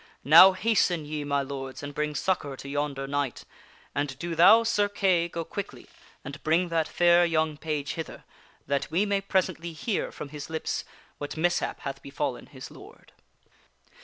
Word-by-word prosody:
Now 170 +7 +9
hasten, 185 -6 +1
ye 150 0 -4
my 140 -1 0
lords, 135 0 -7
and 145 0 -6
bring 150 +1 -2
succor 145 -3 -1
to 140 - -9
yonder 140 -1 -2
knight; 140 -3 -3 0.5
and 140 -1 -2
do 170 +3 -4
thou, 215 +8 +7
Sir 210 -3 +1
Kay, 185 -4 +1
go 165 -1 -5
quickly 200 +4 -7 0.4
and 140 +1 -8
bring 170 +3 +1
that 165 -2 0
fair 175 0 +4
young 160 -2 +1
page 150 -2 -3
hither 160 -1 -7 0.4
that 140 0 -1
we 175 +6 +1
may 200 -1 0
presently 185 -4 -1
hear 195 +6 -2
from 145 - -8
his 150 0 -8
lips 160 0 -3 0.3
what 145 +2 -6
mishap 175 +2 0
hath 135 0 -6
befallen 140 -2 -4
his 130 -2 -11
lord." - - -15
155 Hz, 165 wpm, -27 LUFS, 140-175 Hz, 0.5 s, Now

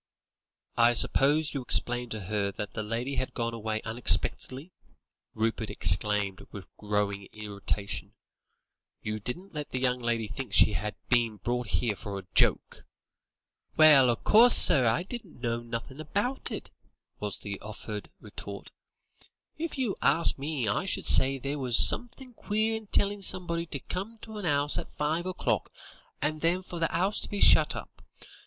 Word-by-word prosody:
"I 120 0 +4
suppose 145 +5 +1
you 140 - -3
explained 120 -1 +2
to 110 -2 -4
her 100 +1 -2
that 105 +1 -7
the 110 - -4
lady 115 +6 -4
had 130 - -4
gone 115 -1 -3
away 110 -1 -4
unexpectedly?" 130 +6 0 0.6
Rupert 110 0 -2
exclaimed 100 +2 +2
with 100 -3 -12
growing 100 -1 -3
irritation; 100 -1 -5 0.9
"you 105 0 -4
didn't 175 - -7
let 150 -2 -6
the 130 - -4
young 125 -1 0
lady 115 -2 -2
think 115 -1 -7
she 105 - +5
had 105 +1 -4
been 115 -3 +1
brought 120 +4 -3
here 100 +4 -1
for 100 0 -7
a 95 - -9
joke?" - - +1 0.9
"Well, 150 -5 +6
o' 120 - +2
course, 230 - +7
sir, 135 -8 +9
I 115 +10 +1
didn't 205 - -10
know 120 -1 -2
nothin' 120 +4 -8
about 205 - -2
it," - - -7 0.5
was - - -3
the - - -7
offended - - -8
retort; - - -9 0.9
"if 330 -2 -4
you 250 -7 -2
ask 155 +5 +2
me, 140 -4 -3
I 105 - -1
should 195 - -2
say 135 +1 +5
there 140 +3 -5
was 125 -4 +1
somethin' 250 +1 0
queer 220 0 -2
in 220 -1 -8
tellin' 200 0 0
somebody 170 -3 0
to 150 - -5
come 195 - -7
to 220 -2 -8
an 190 - -4
'ouse 145 -1 +2
at - - -11
five 160 +4 -2
o'clock, 185 - -2 0.5
and 155 +1 -2
then 175 +3 0
for 175 -2 -8
the 165 - 0
'ouse 190 +5 0
to - - -1
be 205 - -5
shut - - +5
up. - - -10
130 Hz, 165 wpm, -27 LUFS, 110-170 Hz, 0.9 s, sir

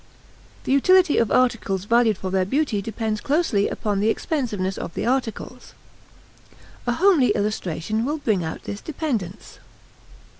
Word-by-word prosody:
The - - -3
utility 365 +4 +4
of 230 - +2
articles 215 -7 +1
valued 230 -2 +3
for 185 -1 -5
their 190 0 +2
beauty 235 0 0
depends 215 0 -3
closely 280 -9 +1
upon 205 -2 -2
the 210 +2 +2
expensiveness 215 - -2
of 165 - -6
the - - -2
articles. 245 -2 -3 1.1
A 240 - +2
homely 325 - +4
illustration 210 0 -2
will 295 +5 -1
bring 215 - 0
out 160 - -5
this 205 - -6
dependence. 240 - -4
225 Hz, 140 wpm, -23 LUFS, 200-270 Hz, 1.1 s, utility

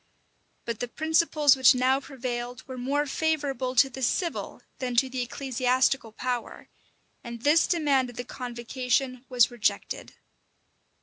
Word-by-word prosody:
But 230 -2 -4
the 245 - -3
principles 310 0 +3
which 260 0 +6
now 260 +2 +2
prevailed 250 -3 -6
were 260 - -7
more 275 +4 -1
favorable 280 -4 -1
to 270 - +6
the 265 0 -9
civil 340 +7 -2 0.2
than 250 -2 -3
to 260 +2 +3
the 255 -1 -2
ecclesiastical 255 -1 0
power; 245 +1 -4 0.5
and 235 -1 -8
this 300 +3 +4
demand 285 -7 +2
of 245 - -12
the 245 - -3
convocation 250 +1 -2
was 245 -1 +4
rejected. 235 -2 -2
255 Hz, 135 wpm, -27 LUFS, 245-275 Hz, 0.5 s, which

